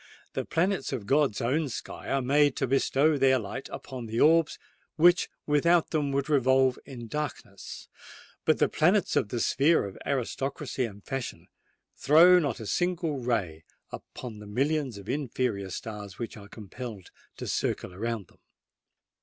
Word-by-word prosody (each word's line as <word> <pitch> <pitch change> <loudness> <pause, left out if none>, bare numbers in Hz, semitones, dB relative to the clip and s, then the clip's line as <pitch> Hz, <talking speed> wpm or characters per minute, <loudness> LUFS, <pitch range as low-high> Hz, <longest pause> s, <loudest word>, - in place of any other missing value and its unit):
The - - -3
planets 180 -2 0
of 110 - -4
God's 135 -3 +2
own 140 +5 0
sky 115 - -7
are 135 -1 +1
made 145 +1 +3
to - - 0
bestow 140 +3 +2
their 130 0 +5
light 115 +3 -6
upon 125 -4 -7
the 115 +2 -2
orbs 165 +1 +4 0.4
which 175 +2 +5 0.2
without 165 +3 +3
them 150 -3 0
would 140 0 -1
revolve 130 -3 +3
in 120 -4 -8
darkness; 145 -8 -6 0.6
but - - +3
the - - +3
planets - - +2
of - - +1
the 120 - -2
sphere 145 +5 +3
of 100 - -8
aristocracy 135 0 -2
and 100 -3 -10
fashion 135 -2 -5 0.5
throw 165 +7 +6
not 145 -5 -2
a 110 - -7
single 170 - -1
ray 100 -11 -2 0.3
upon 115 -4 -8
the 105 - -10
millions 135 +2 -1
of 100 0 -11
inferior 125 -7 -2
stars 100 0 -7
which 115 - -5
are 100 -2 -12
compelled 110 -1 -9 0.3
to - - -6
circle 90 - -2
around 110 +1 -3
them! - - -26
130 Hz, 155 wpm, -28 LUFS, 110-150 Hz, 0.6 s, throw